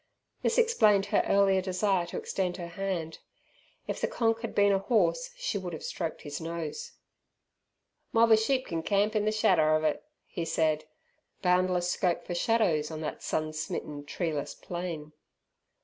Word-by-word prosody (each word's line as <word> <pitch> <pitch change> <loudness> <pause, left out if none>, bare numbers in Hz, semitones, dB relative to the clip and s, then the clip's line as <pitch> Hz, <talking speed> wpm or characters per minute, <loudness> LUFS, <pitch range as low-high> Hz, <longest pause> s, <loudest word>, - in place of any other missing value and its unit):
This - - +1
explained 220 - +4
her - - +5
earlier 195 -1 +4
desire 185 -1 0
to - - -5
extend 185 -2 -2
her 170 -2 -6
hand. 170 -3 -3 0.7
If - - -4
the - - +2
"Konk" 225 -1 0
had 230 - -5
been 205 0 +5
a 195 - +3
horse 255 - +1
she - - -2
would 180 -2 -6
have 160 - -6
stroked 165 -3 -4
his 145 +2 -6
nose. 170 - -5 1.2
"Mob 230 0 +4
er - - +10
sheep 255 +4 +1
can 165 -1 -3
camp 205 +4 +1
in 210 -1 +2
the 215 - +2
shadder 180 -8 +3
of 155 - 0
it," 155 -1 0 0.2
he 170 - -5
said. 155 -1 +1 0.6
Boundless 180 -1 +2
scope 175 -2 0
for 175 - -4
shadows 175 -6 +2
on 160 -1 -6
that 155 - -4
sun 155 0 -2
smitten 150 -1 -4
treeless 150 -1 -3
plain! 170 -4 -6
180 Hz, 165 wpm, -29 LUFS, 160-210 Hz, 1.2 s, er